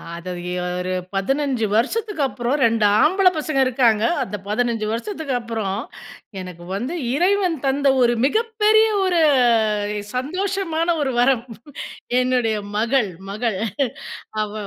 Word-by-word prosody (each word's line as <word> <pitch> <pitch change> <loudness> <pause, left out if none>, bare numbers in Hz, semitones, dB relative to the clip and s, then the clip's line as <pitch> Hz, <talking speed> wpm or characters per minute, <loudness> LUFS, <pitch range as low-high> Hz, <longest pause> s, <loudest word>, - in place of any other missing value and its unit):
அத 170 +2 -9 0.2
எ - - -2 0.3
ஒரு 185 +1 -3 0.2
15 265 +2 0
வருஷத்துக்கப்புறம் 275 - 0
2 225 -1 +2 0.2
ஆம்பள 375 +4 +4
பசங்க 305 -2 -1
இருக்காங்க. 235 -4 +2 0.2
அந்த 210 -3 -6
15 225 0 0
வருஷத்துக்கு 295 - -4
அப்புறம் 220 -4 -3 0.6
எனக்கு 180 -2 -9
வந்து 250 - -3 0.2
இறைவன் 365 -1 +2
தந்த 275 +1 +1 0.2
ஒரு 240 0 +3
மிகப்பெரிய 440 +3 +3 0.2
ஒரு 355 -2 +2 1.0
சந்தோஷமான 345 +3 -1
ஒரு 265 -3 -1
வரம். 245 -1 +3 0.8
என்னுடைய 250 -3 +1 0.2
மகள் 235 -1 +1 0.2
மகள். 215 -2 -2 0.8
அவ 210 0 -3
255 Hz, 110 wpm, -21 LUFS, 225-335 Hz, 1.0 s, ஆம்பள